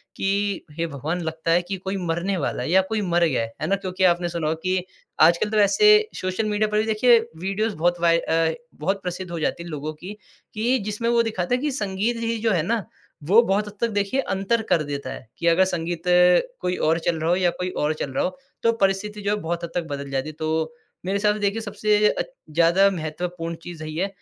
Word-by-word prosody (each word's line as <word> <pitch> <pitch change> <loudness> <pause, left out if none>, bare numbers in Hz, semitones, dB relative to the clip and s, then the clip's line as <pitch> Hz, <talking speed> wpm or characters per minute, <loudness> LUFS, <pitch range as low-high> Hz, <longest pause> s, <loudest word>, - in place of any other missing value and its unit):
कि 200 0 -1
हे 165 - 0
भगवान! 160 +5 -3
लगता 160 0 -2
है 175 - +4
कि 180 +3 -4
कोई 190 +2 -4
मरने 170 +4 -1
वाला 135 -4 -2
है 140 - -3
या 190 - +6
कोई 220 -1 0
मर 175 -2 +1
गया 135 -8 +1
है, 115 0 -5
है 155 - -1
ना? 195 - +2
क्योंकि 185 -1 -3
आपने 175 -1 +3
सुना 170 -2 -2
होगा 160 +1 -1
कि 185 -1 0 0.4
आजकल 170 +5 +5
तो 215 - -1
वैसे 425 - +5
सोशल 185 +4 -1
मीडिया 210 +1 +1
पर 210 - +1
भी - - +2
देखिए 225 +2 +5 0.2
वीडियोज़ 195 +3 -1
बहुत 175 +2 +1
वाय 170 -1 +4
अ, 165 -1 +1 0.3
बहुत 195 +5 -1
प्रसिद्ध 180 0 -4
हो 170 - -3
जाती 165 +2 -2
है 170 - -9
लोगों 155 0 -4
की, 180 +6 -9 0.4
कि 235 +4 +1
जिसमें 215 +3 -1
वो 235 0 +4
दिखाते 220 -1 -1
हैं 255 - -3
कि 300 - 0
संगीत 210 -1 -1
ही 230 0 -1
जो - - +4
है 175 -5 +2
ना 220 +3 0 0.4
वो 200 +10 +6
बहुत 210 -2 0
हद 205 - -8
तक 235 - +2
देखिए 205 +5 0
अंतर 195 +1 0
कर 155 - +3
देता 140 -1 -5
है, - - -11
कि 170 - -1
अगर 170 +3 +5
संगीत 170 -1 -3 0.6
कोई 180 - -1
और 165 +1 +3
चल 165 -1 -1
रहा 160 +1 -1
हो 175 - +4
या 180 -1 +2
कोई 180 0 -1 0.2
और 155 - +1
चल 150 - -4
रहा - - 0
हो 185 - -3 0.3
तो 230 - +5
परिस्थिति 200 +2 0
जो 200 0 0
है - - -4
बहुत 170 +1 -3
हद 170 - -4
तक 175 - 0
बदल 140 0 -4
जाती 135 +3 -2
है। - - -8
तो 160 0 -1 0.3
मेरे 195 +2 0
हिसाब 210 +1 +2
से - - -6
देखिए 205 +2 0
सबसे 210 0 +2
अ, - - -1 0.3
ज़्यादा 170 +5 +4
महत्वपूर्ण 170 0 -4
चीज़ 170 -3 -8
यही 155 0 -6
है 190 - +1
185 Hz, 240 wpm, -23 LUFS, 165-210 Hz, 0.6 s, या